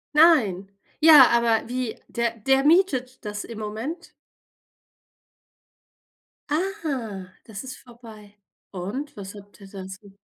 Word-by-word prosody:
Nein. 220 - +4 0.3
Ja, 300 -5 +9
aber 235 -2 +2
wie 250 -2 -4
der 235 -1 -2
der 270 +5 +2
mietet 275 - +1
das 210 0 -5
im 230 -2 -9
Moment. 225 +11 -6 2.4
Ah, 280 - -4
das 220 -1 -8
ist 260 -1 -9
vorbei. 225 -4 -15 0.3
Und, 205 +11 -6
was 195 -1 -8
habt 205 -1 -15
ihr 195 - -12
dazu 195 +1 -11
230 Hz, 110 wpm, -24 LUFS, 205-270 Hz, 2.4 s, Ja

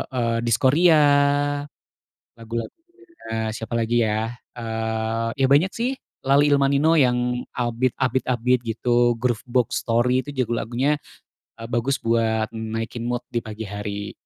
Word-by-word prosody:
eee 115 -2 0
Diskoria, 140 +9 +4 1.4
lagu-lagunya 115 - -6 0.7
siapa 115 +2 -5
lagi 115 0 0
ya, 110 +2 -1 0.2
eee, 115 -1 -2
ya 135 -1 +2
banyak 160 +7 +4
sih 240 +3 0 0.4
Laleilmanino 140 +2 +4
yang 125 -3 +2 0.2
upbeat 120 +1 0
upbeat-upbeat 125 -1 +1
gitu, 120 +1 +1
Groovebox 120 0 0 0.2
Story, 125 +3 +2
itu 145 - -7
juga 120 -2 0
lagunya, 130 +6 0 0.6
eee, 115 - -9
bagus 120 +4 +1
buat 115 -1 +1
naikin 115 +1 -4
mood 120 0 -2
di 120 - 0
pagi 110 0 -7
hari. 100 0 -5
120 Hz, 120 wpm, -23 LUFS, 115-130 Hz, 1.4 s, Diskoria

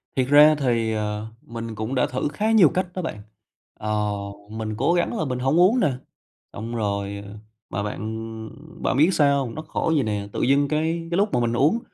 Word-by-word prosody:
Thiệt 130 -2 +1
ra 150 +2 +7
thì, 115 -4 +1
ờ, 105 0 -3
mình 115 -1 -7
cũng 110 +5 -3
đã 125 - +3
thử 130 +3 -2
khá 215 +8 0
nhiều 205 -9 +7
cách 185 +3 -1
đó 185 - -3
bạn, 105 -11 -5 0.6
ờ, 105 0 -1 0.4
mình 110 -1 -4
cố 140 +8 +2
gắng 175 +6 0
là 155 - -1
mình 125 -2 -2
hổng 135 +6 +2
uống 200 +8 +5
nè, 145 - +3 0.6
xong 115 +3 -5
rồi 100 -2 -2 0.5
mà 100 +3 -3
bạn 105 - -4 0.8
bạn - - +1
biết 155 +5 +5
sao 140 -3 +3
hông? 115 - -7
Nó 155 - -4
khổ 160 - -2
vậy 140 - +2
nè, 105 -2 -2
tự - - -2
dưng 140 +2 +3
cái 160 +2 -1
cái 170 - +1
lúc 205 +1 +1
mà - - +3
mình 120 -1 0
uống 150 - +3
130 Hz, 210 wpm, -23 LUFS, 110-155 Hz, 0.8 s, ra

